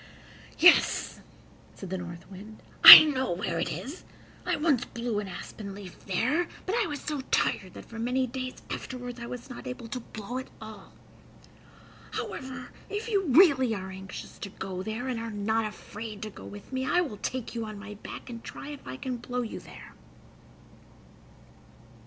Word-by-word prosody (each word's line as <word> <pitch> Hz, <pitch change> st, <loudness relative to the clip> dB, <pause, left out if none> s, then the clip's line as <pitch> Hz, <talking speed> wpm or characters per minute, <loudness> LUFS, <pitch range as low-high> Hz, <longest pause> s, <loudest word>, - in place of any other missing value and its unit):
"Yes," 350 Hz, +1 st, +5 dB, 0.6 s
said 190 Hz, -2 st, -9 dB
the 190 Hz, -, -1 dB
North 170 Hz, -1 st, -8 dB
Wind, 210 Hz, +3 st, -11 dB, 0.2 s
"I -, -, +15 dB
know 265 Hz, -, 0 dB
where 170 Hz, -2 st, -2 dB
it 170 Hz, -, -1 dB
is. 295 Hz, +8 st, -6 dB, 0.4 s
I -, -, +2 dB
once 290 Hz, -5 st, +2 dB
blew 235 Hz, -3 st, -3 dB
an 205 Hz, -, -5 dB
aspen 200 Hz, +1 st, -8 dB
leaf 195 Hz, -2 st, -12 dB
there, 255 Hz, -, +1 dB, 0.2 s
but 375 Hz, -, -2 dB
I 465 Hz, -, +1 dB
was 295 Hz, -2 st, -4 dB
so 300 Hz, -2 st, -3 dB
tired 185 Hz, -2 st, 0 dB
that -, -, -10 dB
for 230 Hz, -, -9 dB
many 250 Hz, +3 st, +1 dB
days 255 Hz, +1 st, -6 dB
afterward 245 Hz, -1 st, -6 dB
I 235 Hz, -, -6 dB
was 245 Hz, 0 st, -7 dB
not 255 Hz, 0 st, -9 dB
able 250 Hz, -2 st, -6 dB
to 250 Hz, -, -4 dB
blow 230 Hz, +1 st, -6 dB
at 260 Hz, -, -8 dB
all. 220 Hz, -1 st, -11 dB, 1.2 s
However, 260 Hz, -1 st, -5 dB, 0.2 s
if 420 Hz, +3 st, -4 dB
you 400 Hz, -3 st, +1 dB
really 265 Hz, -6 st, +5 dB
are 190 Hz, -1 st, -6 dB
anxious 190 Hz, 0 st, -9 dB
to 200 Hz, -, -6 dB
go 185 Hz, -1 st, -6 dB
there, 220 Hz, +5 st, -4 dB
and 250 Hz, -3 st, -2 dB
are 230 Hz, 0 st, -4 dB
not 220 Hz, +1 st, 0 dB
afraid 215 Hz, 0 st, -7 dB
to 215 Hz, -, -6 dB
go -, -, -12 dB
with 205 Hz, +5 st, -11 dB
me, 260 Hz, 0 st, -1 dB
I 350 Hz, +7 st, +2 dB
will 275 Hz, -12 st, -4 dB
take 255 Hz, +3 st, -4 dB
you 230 Hz, -1 st, -3 dB
on 215 Hz, -1 st, -7 dB
my 210 Hz, +1 st, -8 dB
back, 205 Hz, -, -9 dB
and 235 Hz, -2 st, -8 dB
try 280 Hz, -, -8 dB
if 290 Hz, -2 st, -9 dB
I 130 Hz, -, -6 dB
can 255 Hz, -, -4 dB
blow 245 Hz, +1 st, -3 dB
you 225 Hz, -, -6 dB
there." -, -, -13 dB
235 Hz, 180 wpm, -28 LUFS, 205-260 Hz, 1.2 s, I